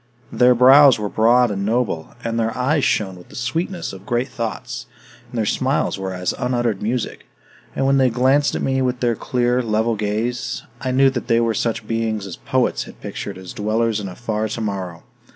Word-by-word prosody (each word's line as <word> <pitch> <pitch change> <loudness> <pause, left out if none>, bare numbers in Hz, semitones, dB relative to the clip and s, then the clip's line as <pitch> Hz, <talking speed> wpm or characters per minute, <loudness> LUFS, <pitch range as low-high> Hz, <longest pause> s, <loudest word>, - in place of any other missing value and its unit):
Their 125 0 +5
brows 135 +2 +7
were 105 -1 -3
broad 120 +2 +4
and 100 -1 -2
noble, 105 -7 -1
and 115 0 -2
their 115 0 -1
eyes 135 +3 +1
shone 95 -3 0
with 90 - -15
the - - -13
sweetness 165 - -3
of 95 0 -10
great 120 +4 -1
thoughts, 115 0 -5 0.4
and 120 - -7
their 110 - +1
smiles 100 - 0
were 95 0 -3
as 90 -1 -2
unuttered 120 -5 0
music; 115 +2 -3 0.5
and 135 - 0
when 135 0 +4
they 130 -1 +4
glanced 130 +4 +2
at - - -2
me 135 0 +1
with 125 -1 0
their 120 -2 +1
clear, 125 +2 0
level 110 0 0
gaze, 110 +4 -2 0.2
I 130 - -2
knew 135 +1 +4
that 120 -2 -4
they 115 -1 +3
were 115 -1 +1
such 110 0 -2
beings 110 -2 -1
as 95 - -6
poets - - 0
had - - -13
pictured 100 -2 -6
as 95 -1 -9
dwellers 110 +1 0
in 100 - -5
a 90 - -9
far 110 -2 -2
tomorrow. 100 -6 -4
115 Hz, 200 wpm, -21 LUFS, 105-125 Hz, 0.5 s, brows